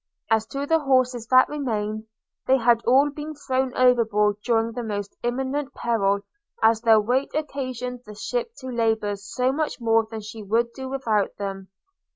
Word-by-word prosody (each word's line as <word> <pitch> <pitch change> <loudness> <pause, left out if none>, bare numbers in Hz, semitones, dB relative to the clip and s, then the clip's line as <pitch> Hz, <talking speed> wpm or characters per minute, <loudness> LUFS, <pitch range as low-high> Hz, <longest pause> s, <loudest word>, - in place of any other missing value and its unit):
As 220 0 +2
to 275 +3 -4
the 325 +2 +3
horses 255 -4 +1
that 255 0 +6
remained, 220 -7 -3 0.4
they 265 - +5
had 235 -1 +3
all 275 +4 +5
been 305 +1 -7
thrown 265 -2 -1
overboard 220 -5 +3
during 230 -1 +1
the 245 - -5
most 205 -3 -4
imminent 265 +3 -2
peril, 200 -4 +1 0.4
as 225 0 +4
their 225 -2 +6
weight 250 +6 0
occasioned 255 -5 -4
the 210 - -9
ship 485 - -3
to 260 - -7
labour 220 -3 0
so 210 +6 -1
much 300 +1 -2
more 225 -1 +2
than 220 -1 -6
she 215 +1 -9
would 230 +3 0
do 265 0 -6
without 225 -7 -1
them. 195 -1 -5
235 Hz, 170 wpm, -24 LUFS, 220-265 Hz, 0.4 s, that